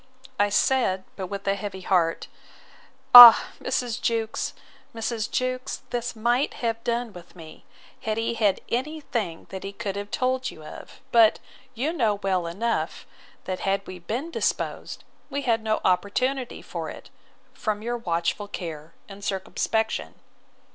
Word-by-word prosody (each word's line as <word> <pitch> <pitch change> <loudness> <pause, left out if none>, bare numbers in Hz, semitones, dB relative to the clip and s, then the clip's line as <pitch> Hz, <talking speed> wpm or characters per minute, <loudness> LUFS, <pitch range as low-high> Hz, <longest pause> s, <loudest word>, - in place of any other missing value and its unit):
I 205 0 +3
said, 205 -4 +2
but 190 - -5
yet - - -10
with 200 -1 -6
a 195 - +3
heavy 200 -1 -6
heart, 175 -3 +1 0.9
Ah! 245 -2 +12
Mrs. 245 -2 -2
Jewkes, 225 -1 -1 0.4
Mrs. 225 0 -3
Jewkes, 255 0 -3
this 240 0 -3
might 240 +5 0
have 230 -1 -3
done 235 -2 -2
with 175 0 -13
me, 160 -3 -13 0.4
had 215 0 -2
he 230 +1 -1
had 210 -4 +1
any 300 +6 -2
thing 210 - -4
that 190 - -6
he 195 - -5
could 200 -1 -5
have 205 0 -5
told 255 +2 -1
you 155 - -12
of. 155 - -11
But 225 -2 +6 0.4
you 280 +8 -1
know 225 -10 +1
well 190 -3 -1
enough, 225 +8 -2 0.4
that 185 -1 -4
had 195 0 -1
we 185 -1 -9
been 240 - -4
disposed, - - -3 0.3
we 280 +1 -3
had 230 -3 +1
no 220 0 0
opportunity 240 +8 0
for - - -5
it, - - -11 0.4
from 215 -1 -3
your 240 +1 -2
watchful 170 +1 -2
care 160 -5 -7
and 200 0 -11
circumspection. 220 +3 -2
220 Hz, 155 wpm, -25 LUFS, 195-240 Hz, 0.9 s, Ah